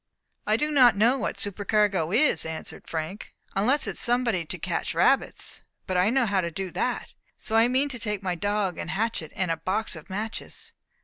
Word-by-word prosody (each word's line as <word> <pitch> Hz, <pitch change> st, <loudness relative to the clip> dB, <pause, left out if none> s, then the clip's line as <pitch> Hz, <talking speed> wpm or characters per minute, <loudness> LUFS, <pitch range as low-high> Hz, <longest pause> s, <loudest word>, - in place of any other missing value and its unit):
"I 215 Hz, +1 st, +3 dB
do 300 Hz, +5 st, 0 dB
not 250 Hz, -7 st, +6 dB
know 240 Hz, +6 st, +4 dB
what -, -, -2 dB
supercargo 205 Hz, -4 st, +1 dB
is," 235 Hz, -, +3 dB
answered 160 Hz, 0 st, -6 dB
Frank, 165 Hz, +6 st, -5 dB, 0.2 s
"unless 250 Hz, +9 st, +4 dB
it -, -, -1 dB
is -, -, -6 dB
somebody 235 Hz, -7 st, +1 dB
to -, -, -4 dB
catch -, -, -2 dB
rabbits. -, -, +1 dB, 0.2 s
But 185 Hz, -, -2 dB
I 180 Hz, +3 st, +4 dB
know 260 Hz, +1 st, +3 dB
how 195 Hz, -3 st, +1 dB
to 170 Hz, -, -2 dB
do 185 Hz, +2 st, -5 dB
that. -, -, -2 dB, 0.2 s
So 220 Hz, -, -1 dB
I 225 Hz, +1 st, +6 dB
mean 260 Hz, +3 st, +2 dB
to 255 Hz, -3 st, -4 dB
take 210 Hz, -3 st, -2 dB
my 185 Hz, -1 st, 0 dB
dog 205 Hz, +1 st, -1 dB
and -, -, -5 dB
hatchet, 190 Hz, -4 st, -2 dB
and 180 Hz, -3 st, 0 dB
a 165 Hz, -, 0 dB
box 190 Hz, +6 st, -1 dB
of 155 Hz, -, -11 dB
matches." 215 Hz, +4 st, -5 dB
205 Hz, 200 wpm, -26 LUFS, 180-230 Hz, 0.2 s, not